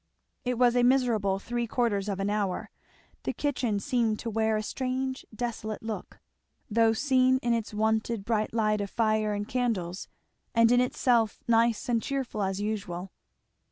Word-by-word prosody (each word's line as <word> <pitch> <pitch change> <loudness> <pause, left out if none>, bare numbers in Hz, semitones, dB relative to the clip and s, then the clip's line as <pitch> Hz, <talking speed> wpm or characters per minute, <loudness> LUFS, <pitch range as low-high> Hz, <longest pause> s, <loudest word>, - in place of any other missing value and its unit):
It 250 -1 -1
was 245 0 +4
a 245 - +4
miserable 240 -6 +3
three 235 +4 -3
quarters 210 -4 0
of 195 -1 -2
an 195 +1 0
hour. 205 -3 -2 0.5
The - - -2
kitchen 245 -7 -1
seemed 230 -3 +1
to 230 - -4
wear 220 0 +1
a 215 - -2
strange 260 +2 -3
desolate 220 -2 -4
look, 220 -1 -6 0.5
though 225 +1 +4
seen 260 +1 +3
in 240 0 +2
its 230 -2 -2
wonted 220 0 0
bright 215 -1 0
light 215 -2 +1
of 200 - -3
fire 215 -1 +1
and 205 0 -3
candles, 210 -9 -2 0.5
and 230 0 +5
in 245 0 +5
itself 240 -3 +2
nice 230 -1 +3
and 235 -2 +1
cheerful 265 -6 -3
as 190 0 -1
usual. 200 -4 -3
225 Hz, 160 wpm, -28 LUFS, 210-245 Hz, 0.5 s, and